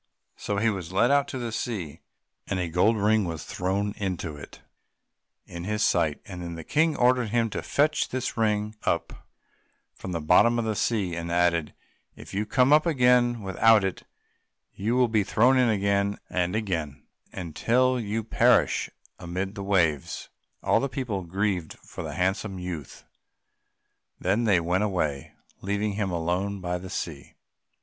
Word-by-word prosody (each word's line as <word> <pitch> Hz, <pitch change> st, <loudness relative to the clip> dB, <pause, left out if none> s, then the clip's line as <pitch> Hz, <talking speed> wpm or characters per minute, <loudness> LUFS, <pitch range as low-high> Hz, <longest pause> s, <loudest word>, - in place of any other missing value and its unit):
So 100 Hz, -, -3 dB
he 110 Hz, +2 st, +2 dB
was 95 Hz, -4 st, -6 dB
led 120 Hz, +7 st, +3 dB
out 140 Hz, 0 st, +3 dB
to 130 Hz, -, -5 dB
the 120 Hz, -2 st, -4 dB
sea, 95 Hz, -, -4 dB, 0.5 s
and 95 Hz, -, -1 dB
a 90 Hz, -, -1 dB
gold 90 Hz, +7 st, +2 dB
ring 105 Hz, +1 st, +3 dB
was 85 Hz, -3 st, -4 dB
thrown 100 Hz, +3 st, -2 dB
into 90 Hz, -6 st, -3 dB
it, 70 Hz, -, -12 dB, 0.8 s
in 85 Hz, 0 st, -8 dB
his 105 Hz, +3 st, -1 dB
sight; 75 Hz, -2 st, +1 dB
then 90 Hz, -4 st, -7 dB
the 80 Hz, -, -7 dB
King 160 Hz, -, +2 dB
ordered 125 Hz, -2 st, +3 dB
him 115 Hz, 0 st, +1 dB
to -, -, -3 dB
fetch 150 Hz, +1 st, +1 dB
this 130 Hz, -1 st, -3 dB
ring 105 Hz, -1 st, 0 dB
up -, -, -2 dB, 0.7 s
from 95 Hz, -, -8 dB
the 85 Hz, -, -2 dB
bottom 95 Hz, +9 st, +4 dB
of 115 Hz, -, 0 dB
the 110 Hz, -1 st, -1 dB
sea, 100 Hz, -4 st, 0 dB
and 85 Hz, 0 st, -4 dB
added, 85 Hz, -2 st, +1 dB, 0.4 s
"If -, -, -12 dB
you 105 Hz, +2 st, -1 dB
come 130 Hz, +5 st, +4 dB
up 155 Hz, +3 st, +5 dB
again 125 Hz, -5 st, +3 dB
without 105 Hz, +3 st, +4 dB
it 95 Hz, -1 st, -2 dB, 0.7 s
you 110 Hz, +5 st, -1 dB
will 125 Hz, -1 st, +4 dB
be 110 Hz, -2 st, +2 dB
thrown 125 Hz, +7 st, +3 dB
in 125 Hz, -2 st, +4 dB
again 100 Hz, -1 st, +1 dB
and 90 Hz, +1 st, 0 dB
again 85 Hz, -10 st, -3 dB, 0.3 s
until 125 Hz, +9 st, +1 dB
you 110 Hz, 0 st, -2 dB
perish 110 Hz, -, +3 dB, 0.3 s
amid 95 Hz, +3 st, -4 dB
the 100 Hz, -, -7 dB
waves." 85 Hz, -8 st, 0 dB, 0.3 s
All -, -, +3 dB
the 140 Hz, -, -2 dB
people 125 Hz, -8 st, -3 dB
grieved 95 Hz, -2 st, -1 dB
for -, -, -9 dB
the -, -, -6 dB
handsome 95 Hz, +2 st, -1 dB
youth; 90 Hz, -7 st, -7 dB, 1.1 s
then 105 Hz, +6 st, +1 dB
they 100 Hz, -5 st, +4 dB
went 90 Hz, +4 st, 0 dB
away, 80 Hz, -9 st, -2 dB, 0.3 s
leaving 100 Hz, +1 st, -1 dB
him 100 Hz, -1 st, -1 dB
alone 90 Hz, +4 st, -1 dB
by 90 Hz, -1 st, -3 dB
the 95 Hz, +1 st, -9 dB
sea. 80 Hz, -7 st, -6 dB
100 Hz, 165 wpm, -26 LUFS, 90-115 Hz, 1.1 s, up